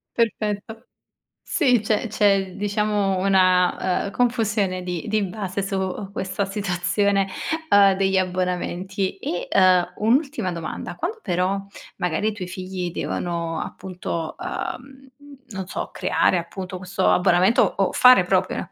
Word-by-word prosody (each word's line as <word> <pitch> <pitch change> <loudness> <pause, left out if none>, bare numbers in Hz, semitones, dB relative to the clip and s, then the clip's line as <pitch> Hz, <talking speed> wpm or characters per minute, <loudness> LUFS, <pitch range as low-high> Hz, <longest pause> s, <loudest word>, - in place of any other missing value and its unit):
Perfetto. 220 -1 -2 0.6
Sì, 255 -7 +3
c'è 215 +2 0
c'è 200 -3 +2
diciamo 205 -1 0
una, 185 -1 +2
uhm, 200 - -5
confusione 215 -7 0
di 180 -2 -4
di 215 0 +1
base 195 0 -4
su 195 0 -3
questa 195 0 -2
situazione 195 0 0 0.4
uhm, 200 -1 +6
degli 190 0 +1
abbonamenti. 185 +1 -2
E 175 -2 -4
uhm, 180 -1 +4
un'ultima 255 - +1
domanda, 170 -2 -6
quando 450 - -4
però 185 +2 0 0.4
magari 180 +4 -1
i 220 - +2
tuoi 190 -3 -6
figli 185 -1 -5
devono 170 -1 -3
appunto, 175 -3 -5
uhm, 270 +1 -6 0.4
non 190 -2 -5
so, - - -4
creare 185 - +2
appunto 185 +2 -6
questo 185 +1 0
abbonamento 185 +4 +4 0.2
o 195 -1 +1
fare 250 -6 +7
proprio 185 0 +1
190 Hz, 125 wpm, -23 LUFS, 180-210 Hz, 0.6 s, fare